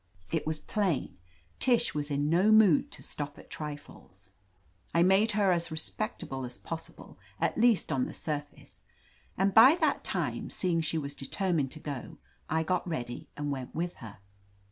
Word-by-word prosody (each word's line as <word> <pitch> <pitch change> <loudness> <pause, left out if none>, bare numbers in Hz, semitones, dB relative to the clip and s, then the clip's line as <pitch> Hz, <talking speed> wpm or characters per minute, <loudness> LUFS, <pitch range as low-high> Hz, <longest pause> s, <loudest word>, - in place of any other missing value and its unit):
It - - -1
was 155 0 +1
plain, 180 - -2 0.4
Tish 240 -2 +3
was 150 0 -3
in 145 0 0
no 180 +7 +4
mood 215 -8 +6
to - - -10
stop 145 0 -5
at - - -15
trifles. 145 -10 -8 0.6
I 170 - +5
made 195 +4 +4
her 200 -2 +3
as 170 -1 0
respectable 160 - -4
as 125 -1 -5
possible, 165 0 -8 0.2
at - - +1
least 230 -3 +3
on 130 -2 +1
the - - -7
surface, 145 - -6 0.5
and 195 +1 +2
by 255 +8 +9
that - - +1
time, - - -2
seeing 175 -3 +1
she 160 +1 0
was 140 -2 -3
de 135 - -7
termined 170 -6 0
to 155 - -10
go, 140 -4 -6 0.3
I 160 +1 +1
got 180 +2 -1
ready 120 -7 -5
and 145 -1 -2
went 130 -2 -5
with 175 +2 -2
her. 110 -4 -10
160 Hz, 170 wpm, -30 LUFS, 145-190 Hz, 0.6 s, by